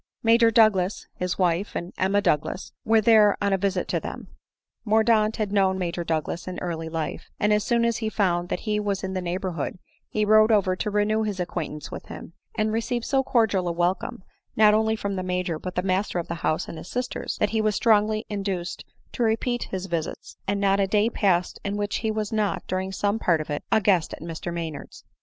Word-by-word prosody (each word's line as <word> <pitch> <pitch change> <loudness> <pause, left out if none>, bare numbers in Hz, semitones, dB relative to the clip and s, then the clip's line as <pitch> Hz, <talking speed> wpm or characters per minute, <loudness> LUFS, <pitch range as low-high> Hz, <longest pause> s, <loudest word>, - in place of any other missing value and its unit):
Major 230 0 +5
Douglas, 215 -4 +3
his 180 -1 -3
wife, 180 +2 0
and 175 +2 -4
Emma 195 +2 +2
Douglas 150 +5 0
were 225 0 +4
then 215 -2 +6
on 200 -1 +1
a - - +3
visit 195 -1 0
to - - +1
them. - - -7 0.5
Mordaunt 220 0 +3
had 215 -3 -2
known 190 -2 +2
Major 175 -1 -2
Douglas 165 +1 -2
in 185 - -5
early 165 -2 -4
life; 160 -1 -4
and 210 0 +3
as 210 0 +2
soon 235 +1 +2
as 235 -1 +1
he 220 -1 -2
found 175 -5 0
that - - -2
he 210 -1 -1
was 200 -2 -2
in 190 0 -3
the 185 - -2
neighborhood, 180 -2 -3 0.3
he 215 0 0
rode 215 +1 +6
over 190 -4 +3
to 210 - -2
renew 210 +1 +1
his 210 -3 -2
acquaintance 155 -4 -4
with - - -8
him; - - -9 0.2
and 215 0 +1
re 225 - +1
ceived 240 0 -2
so 270 -1 +2
cordial 220 -8 +2
a - - +1
welcome, 175 +2 -1 0.3
not 215 -1 +6
only 220 +1 +2
from 200 -2 -3
the - - -1
Major, 180 -3 -2
but 180 +1 -6
the 180 - 0
master 190 0 0
of 170 - -2
the - - -3
house 155 - 0
and 165 - -7
bis 160 - -9
sisters, 250 0 -3
that 205 - +1
he 220 -1 +1
was 215 -1 +1
strongly 215 -1 +3
induced 195 -4 -3 0.3
to - - -5
repeat 235 +2 0
his 190 -1 -4
visits, 170 -4 -4
and 200 +1 0
not 200 0 +2
a 195 - +2
day 210 +3 +2
pass 180 -5 +1
ed - - -15
in - - -2
which 205 0 -1
he 220 - -2
was 215 -1 -2
not, 205 -4 0
during 190 +1 -2
some 205 +3 0
part 170 -6 +2
of 155 0 -5
it, 145 - -3
a 220 - +5
guest 190 -6 +2
at - - -18
Mr 165 +1 -5
Maynard's. 165 -3 -6
200 Hz, 225 wpm, -25 LUFS, 180-215 Hz, 0.5 s, then